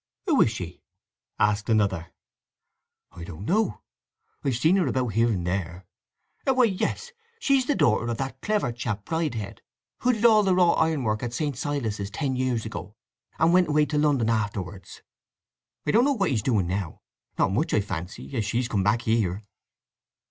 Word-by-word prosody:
"Who 320 -8 +3
is - - +5
she?" 90 -6 -7 0.6
asked 105 +1 +1
another. 100 -6 +1 1.0
"I 85 - -10
don't 85 +3 -8
know—I've 215 - -3
seen 160 +10 +3
her 185 - +2
about 130 -2 0
here 115 +3 +2
and 95 -7 -1
there. 90 0 -3 0.6
Why, 260 -1 +4
yes, 235 - -1 0.3
she's 270 - +2
the 290 - +2
daughter 115 +1 +2
of 115 -1 -2
that 135 0 -5
clever 210 - 0
chap 115 -3 -4
Bridehead 120 -11 -3 0.4
who 250 - +3
did 225 -1 -1
all 220 -2 +7
the 190 -3 +2
wrought 180 -2 +4
ironwork 135 -10 +1
at 120 -1 -4
St. 145 -4 -1
Silas' 115 -8 -3
ten 130 +4 -2
years 125 -3 -1
ago, 110 -1 -7 0.4
and 165 +2 +3
went 180 0 +5
away 150 0 +3
to 150 0 -1
London 140 -7 +2
afterwards. 100 -4 -4 0.8
I 150 - +2
don't 235 +3 +4
know 285 - +3
what 195 -8 0
he's 115 -5 +1
doing 105 -5 +1
now—not 90 0 -3
much 155 - 0
I - - +3
fancy—as 100 +5 -4
she's 120 +4 -1
come 105 -6 0
back 105 +4 +1
here." 110 -3 0
120 Hz, 165 wpm, -26 LUFS, 105-165 Hz, 1.0 s, all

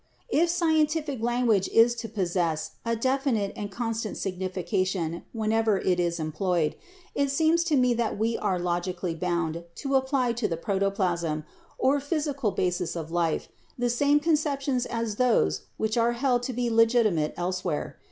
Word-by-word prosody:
"If 340 -1 +3
scientific 315 -5 +1
language 235 -4 +2
is 230 +1 +5
to 230 -1 -5
possess 175 -6 -1
a 230 0 0
definite 260 -4 0
and 205 - -5
con 230 +3 -2
stant 220 -1 -4
signification 185 -2 -2
whenever 220 -1 +1
it 180 -1 +1
is 170 -1 0
employed, 155 0 0 0.4
it 280 0 +1
seems 320 +4 +3
to 320 -3 +2
me 250 -2 +4
that 230 -3 -1
we 225 +2 0
are 195 -3 0
logically 175 0 -2
bound 170 -1 -2
to 275 -1 -3
apply 265 -2 +2
to 230 -2 -1
the 165 -4 -3
protoplasm, 180 -4 -1 0.3
or 280 +2 +3
physical 285 -4 -1
basis 180 -3 -1
of 165 -1 -5
life, 170 -2 0 0.3
the 245 -1 +1
same 285 +4 +3
conceptions 290 -4 0
as 230 -3 -3
those 230 - +2
which 220 +1 -1
are 235 +1 +3
held 245 0 +1
to - - -2
be 240 0 -1
legitimate 225 -9 +3
elsewhere. 175 -3 -3
220 Hz, 155 wpm, -27 LUFS, 180-255 Hz, 0.4 s, is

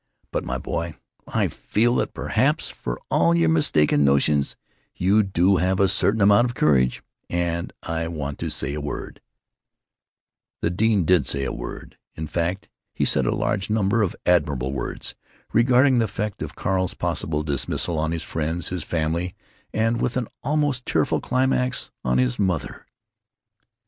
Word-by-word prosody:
But, - - -1
my 65 - -3
boy, - - -4 0.3
I - - +1
feel 120 +3 0
that - - -2
perhaps, - - +1
for - - -5
all 85 0 +4
your 85 -1 +3
mistaken 75 -2 +3
notions, 70 +1 +2 0.4
you 100 +4 +3
do 95 -1 +2
have 95 +2 +1
a 100 - +5
certain 100 +3 +2
amount 100 +4 +6
of 120 -1 -3
courage, 65 -4 +2 0.3
and 85 -1 -1
I 80 0 -2
want 75 -4 -5
to - - -3
say 70 - 0
a 75 - -4
word——" 75 - -6 1.4
The 85 - 0
dean 105 -1 +2
did 90 -2 +3
say 70 -1 0
a - - -2
word; - - -8 0.2
in 80 - -4
fact 85 +4 -2 0.3
he - - +1
said - - +2
a - - +1
large 60 - -1
number 110 +1 +2
of 100 - 0
admirable 70 -7 +1
words, 70 - -4 0.4
regarding 125 +2 +4
the 115 - +3
effect 105 -1 -4
of - - -5
Carl's 95 -1 -1
possible 75 -1 -1
dismissal 75 +3 -1
on 80 +1 0
his 85 -1 -2
friends, 80 +1 -2
his 90 -4 -3
family, 85 +2 -2 0.4
and, 115 +2 0
with 125 - 0
an 120 -3 -1 0.2
almost 145 -2 0
tearful - - +1
climax, 125 0 0
on 60 0 +1
his 65 -1 +1
mother. 90 -6 -2
85 Hz, 160 wpm, -23 LUFS, 75-105 Hz, 1.4 s, amount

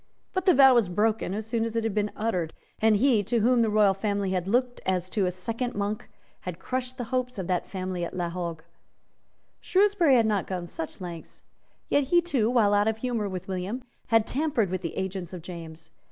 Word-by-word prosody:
But 375 0 -2
the 365 - +7
vow 265 -1 +8
was 235 -7 +3
broken 210 +1 0
as 215 0 -4
soon 225 0 -1
as 230 0 -3
it 230 - +1
had 225 -2 -1
been 210 0 0
uttered; 180 -7 -2 0.3
and 220 -1 +5
he 235 0 +4
to 230 +2 +1
whom 245 +2 +4
the 225 - +2
royal 210 -2 +4
family 200 -1 -1
had 185 -1 -1
looked 245 +3 0
as 185 -1 -1
to 200 -4 +1
a - - 0
second 230 +7 -3
Monk 205 +1 -3 0.3
had 180 -2 -6
crushed 255 +3 -4
the 245 - -3
hopes 250 -1 -1
of 190 - -3
that 180 0 -1
family 185 -2 -3
at 170 - -5
La 175 -2 -1
Hogue. 170 -2 -4 1.0
Shrewsbury 380 -7 +3
had 230 -2 +4
not 210 -3 0
gone 180 -2 -3
such 165 +1 -7
lengths. 170 -2 -8 0.4
Yet 285 -1 +2
he 345 +6 +4
too, 275 -11 +1
while 225 -5 +3
out 205 +1 +3
of 220 0 +1
humour 225 -3 -2
with 185 -1 -6
William, 195 +7 -3 0.2
had 225 -1 +4
tampered 260 - 0
with 185 -1 -2
the 165 - -5
agents 190 -2 -4
of 175 -3 -7
James. 165 -2 -9
210 Hz, 215 wpm, -27 LUFS, 185-245 Hz, 1.0 s, vow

